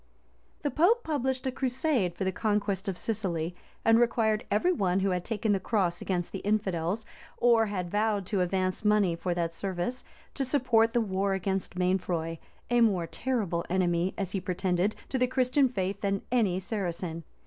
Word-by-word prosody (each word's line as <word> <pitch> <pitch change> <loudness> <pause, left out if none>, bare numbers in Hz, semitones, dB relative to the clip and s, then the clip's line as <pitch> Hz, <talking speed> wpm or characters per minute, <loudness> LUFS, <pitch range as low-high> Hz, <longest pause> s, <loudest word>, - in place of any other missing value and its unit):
The 290 - 0
pope 420 +10 +3
published 265 -4 -1
a 260 - 0
crusade 255 - 0
for 195 - -3
the 190 - +1
conquest 200 -1 -1
of 190 -2 -2
Sicily; 180 -6 -2 0.3
and 225 0 +6
required 225 -2 +2
every 215 - +2
one 190 - +1
who 195 0 +1
had 180 -1 -1
taken 220 0 -1
the 195 - +2
cross 185 -4 0
against 175 -2 -2
the 195 - -4
infidels, 200 -1 -1 0.3
or 235 -2 +4
had 180 -4 -3
vowed 210 -2 +1
to 195 0 0
advance 185 +2 0
money 210 -5 +3
for 175 +1 -2
that 170 -1 -1
service, 190 +7 -3 0.3
to 275 - -1
support 240 -4 +3
the 240 - +3
war 195 -1 0
against 190 0 -2
Mainfroy, 175 -3 0 0.3
a 240 0 +4
more 195 -7 +3
terrible 200 -5 -1
enemy, 175 0 +1
as 195 -3 -2
he 195 - -2
pretended, 185 +2 0
to 260 - -1
the 250 - +3
Christian 255 +1 +2
faith 195 -3 -2
than 195 0 -1
any 210 -7 +2
Saracen. 175 -4 -4
195 Hz, 175 wpm, -29 LUFS, 180-230 Hz, 0.3 s, and